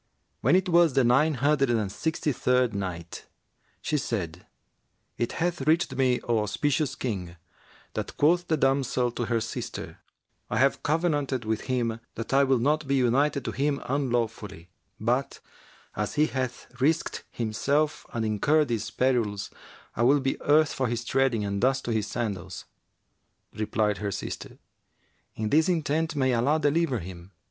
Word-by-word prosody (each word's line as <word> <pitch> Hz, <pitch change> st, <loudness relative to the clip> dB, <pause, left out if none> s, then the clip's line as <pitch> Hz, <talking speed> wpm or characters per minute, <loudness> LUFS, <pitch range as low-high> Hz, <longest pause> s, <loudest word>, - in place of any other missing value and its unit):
When -, -, +3 dB
it 185 Hz, +1 st, +2 dB
was 170 Hz, -4 st, +4 dB
the 135 Hz, -1 st, +4 dB
Nine 135 Hz, +6 st, +3 dB
Hundred 140 Hz, +1 st, +2 dB
and 110 Hz, -5 st, 0 dB
Sixty 160 Hz, +4 st, -1 dB
third 125 Hz, -2 st, +1 dB
Night, 90 Hz, -4 st, -5 dB, 0.6 s
She 150 Hz, -, 0 dB
said, 90 Hz, -, -4 dB, 0.7 s
It 120 Hz, -, -1 dB
hath 175 Hz, -2 st, -1 dB
reached 160 Hz, -3 st, +2 dB
me, 130 Hz, -2 st, +2 dB
O 115 Hz, -2 st, +1 dB
auspicious 135 Hz, +7 st, 0 dB
King, 95 Hz, -10 st, -4 dB, 0.6 s
that -, -, -5 dB
quoth 175 Hz, +4 st, +3 dB
the 160 Hz, -, +1 dB
damsel 135 Hz, -3 st, +1 dB
to 120 Hz, 0 st, -3 dB
her 115 Hz, -1 st, +1 dB
sister, 110 Hz, -, -6 dB, 0.5 s
"I -, -, -1 dB
have 135 Hz, +1 st, +3 dB
covenanted 145 Hz, -6 st, 0 dB
with 110 Hz, 0 st, -2 dB
him 115 Hz, -3 st, 0 dB, 0.2 s
that 115 Hz, +3 st, -5 dB
I 140 Hz, +1 st, +5 dB
will 135 Hz, -1 st, +3 dB
not 150 Hz, +4 st, +1 dB
be 140 Hz, -, +2 dB
united 135 Hz, +2 st, +2 dB
to -, -, -2 dB
him 140 Hz, 0 st, 0 dB
unlawfully; 115 Hz, -, -2 dB, 0.3 s
but, 125 Hz, +5 st, -1 dB, 0.6 s
as -, -, -2 dB
he 150 Hz, -, +4 dB
hath 130 Hz, -4 st, -3 dB, 0.2 s
risked 155 Hz, +4 st, +1 dB
himself 140 Hz, +7 st, -1 dB
and 115 Hz, -1 st, -2 dB
incurred 140 Hz, +8 st, +2 dB
these 115 Hz, -3 st, -2 dB
perils, 115 Hz, -6 st, 0 dB, 0.4 s
I -, -, -2 dB
will 135 Hz, +5 st, +5 dB
be 135 Hz, 0 st, -2 dB
earth 150 Hz, +1 st, +4 dB
for 130 Hz, -, 0 dB
his 120 Hz, 0 st, -3 dB
treading 125 Hz, -4 st, +1 dB
and 100 Hz, 0 st, -2 dB
dust 135 Hz, +2 st, +2 dB
to 120 Hz, -, -2 dB
his 110 Hz, -2 st, 0 dB
sandals!" 100 Hz, -7 st, -4 dB, 0.9 s
Replied 105 Hz, -2 st, 0 dB
her 105 Hz, -, -2 dB
sister, 100 Hz, -, -6 dB, 0.8 s
"In 110 Hz, -1 st, -2 dB
this 160 Hz, +4 st, +4 dB
intent 160 Hz, -1 st, 0 dB
may 130 Hz, -2 st, +2 dB
Allah 135 Hz, +7 st, +2 dB
deliver 150 Hz, -2 st, +1 dB
him!" 90 Hz, 0 st, -9 dB
130 Hz, 155 wpm, -27 LUFS, 110-145 Hz, 0.9 s, I